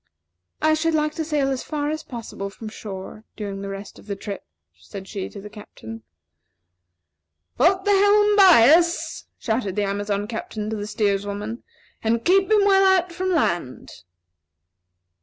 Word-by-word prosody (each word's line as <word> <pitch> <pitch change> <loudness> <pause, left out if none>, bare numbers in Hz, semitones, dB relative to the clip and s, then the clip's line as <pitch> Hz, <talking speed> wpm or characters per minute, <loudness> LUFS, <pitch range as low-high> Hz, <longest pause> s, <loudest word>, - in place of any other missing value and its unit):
"I 310 0 +4
should 320 +1 +1
like 305 0 0
to 320 - -3
sail 295 -3 0
as 265 - -2
far 295 -1 -3
as 310 0 -3
possible 230 -8 -7
from 215 +2 -9
shore 205 0 -8
during 200 -2 -5
the 200 - -5
rest 195 +1 -8
of - - -17
the 200 - -3
trip," 200 0 -7 0.3
said 195 -2 -10
she 195 -2 -5
to 200 - -10
the 205 - -9
Captain. 115 - -11 1.5
"Put 375 - +3
the 410 - +3
helm 410 +1 +4
bias!" 340 - +5
shouted 220 -5 -2
the 210 - 0
Amazon 205 +1 -2
Captain 220 -1 -5
to - - -2
the 205 -1 -5
steers 205 -2 0
woman; 210 +3 -5 0.4
"and 230 +1 0
keep 385 +2 +4
him 420 -2 +4
well 390 -1 +5
out 375 -2 +3
from 370 +2 -3
land." 175 - -1
230 Hz, 160 wpm, -23 LUFS, 205-335 Hz, 1.5 s, bias